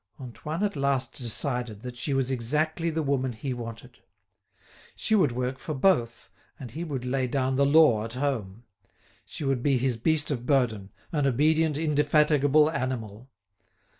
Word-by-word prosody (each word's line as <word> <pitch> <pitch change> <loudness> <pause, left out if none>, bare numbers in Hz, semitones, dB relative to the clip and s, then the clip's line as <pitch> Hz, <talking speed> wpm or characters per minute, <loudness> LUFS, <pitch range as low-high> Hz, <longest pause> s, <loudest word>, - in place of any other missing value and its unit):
Antoine 150 - -5
at 205 -4 -1
last 140 -3 0
decided 120 -2 -2
that 125 -1 -7
she 120 +4 -3
was 135 -1 0
exactly 155 +7 0
the 160 0 -2
woman 135 -3 0
he 125 +4 -4
wanted. 115 -2 -9 1.0
She 220 - -1
would 195 - +4
work 125 +2 -3
for 155 +4 -5
both 115 - +1 0.3
and 125 -4 -8
he 160 +7 -5
would 135 -7 -4
lay 130 0 0
down 130 +1 0
the 140 +1 +3
law 140 -8 +5
at 115 +1 -6
home. 120 -6 -3 0.6
She - - -7
would 135 -3 0
be 135 0 +2
his 125 -1 0
beast 150 +5 +1
of 125 -3 -4
burden, 115 -8 +1 0.2
an 145 -3 +1
obedient, 155 +3 +2
indefatigable 150 -1 +3
animal. 125 -4 -4
135 Hz, 160 wpm, -27 LUFS, 120-150 Hz, 1.0 s, law